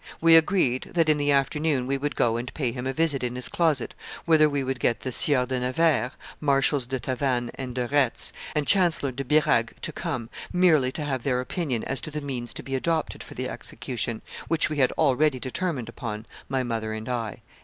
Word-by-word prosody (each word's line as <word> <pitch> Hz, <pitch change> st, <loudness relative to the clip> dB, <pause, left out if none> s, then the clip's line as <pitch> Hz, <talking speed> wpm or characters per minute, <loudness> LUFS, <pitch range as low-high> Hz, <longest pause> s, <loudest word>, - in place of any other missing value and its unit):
We 165 Hz, 0 st, +6 dB
agreed 160 Hz, -7 st, +3 dB
that, 165 Hz, -2 st, +3 dB
in 150 Hz, -1 st, +3 dB
the 145 Hz, 0 st, +2 dB
afternoon, 140 Hz, 0 st, +1 dB
we 135 Hz, +2 st, 0 dB
would 140 Hz, 0 st, -2 dB
go 115 Hz, -1 st, +2 dB
and 120 Hz, +2 st, -5 dB
pay 130 Hz, -6 st, 0 dB
him 125 Hz, +1 st, -5 dB
a -, -, 0 dB
visit 145 Hz, -2 st, +2 dB
in 125 Hz, 0 st, -2 dB
his 125 Hz, -, -2 dB
closet, 155 Hz, -7 st, +1 dB, 0.3 s
whither 155 Hz, -2 st, +5 dB
we 140 Hz, -1 st, -1 dB
would 130 Hz, -1 st, -3 dB
get 115 Hz, 0 st, +1 dB
the 130 Hz, -, -4 dB
Sieur 130 Hz, 0 st, +4 dB
de 130 Hz, 0 st, -2 dB
Nevers, 130 Hz, +1 st, +1 dB, 0.3 s
Marshals 140 Hz, -2 st, +2 dB
de 130 Hz, 0 st, -2 dB
Tavannes 125 Hz, -1 st, -1 dB
and 130 Hz, -2 st, -6 dB
de 125 Hz, -1 st, -1 dB
Retz, 140 Hz, -2 st, +3 dB, 0.2 s
and 150 Hz, -1 st, +1 dB
Chancellor 170 Hz, -8 st, +2 dB
de 135 Hz, +2 st, -5 dB
Birague 140 Hz, -4 st, +2 dB
to -, -, -1 dB
come, 115 Hz, -2 st, -4 dB, 0.2 s
merely 160 Hz, -8 st, +4 dB
to 150 Hz, +2 st, -4 dB
have 135 Hz, -3 st, -2 dB
their 125 Hz, -1 st, 0 dB
opinion 130 Hz, -, -2 dB
as 135 Hz, -, -3 dB
to -, -, -6 dB
the 150 Hz, 0 st, -4 dB
means 130 Hz, -5 st, -5 dB
to -, -, -7 dB
be 135 Hz, -, -6 dB
adopted 160 Hz, +4 st, -1 dB
for -, -, -10 dB
the -, -, -3 dB
execution, 120 Hz, -2 st, -3 dB, 0.2 s
which 160 Hz, -1 st, +1 dB
we 150 Hz, -, -2 dB
had 130 Hz, -3 st, +3 dB
already 145 Hz, -2 st, +2 dB
determined 135 Hz, -1 st, -2 dB
upon, 110 Hz, -2 st, -6 dB, 0.2 s
my 130 Hz, -1 st, 0 dB
mother 110 Hz, -2 st, -3 dB
and 110 Hz, 0 st, -6 dB
I." 115 Hz, -5 st, -3 dB
135 Hz, 210 wpm, -26 LUFS, 125-150 Hz, 0.3 s, We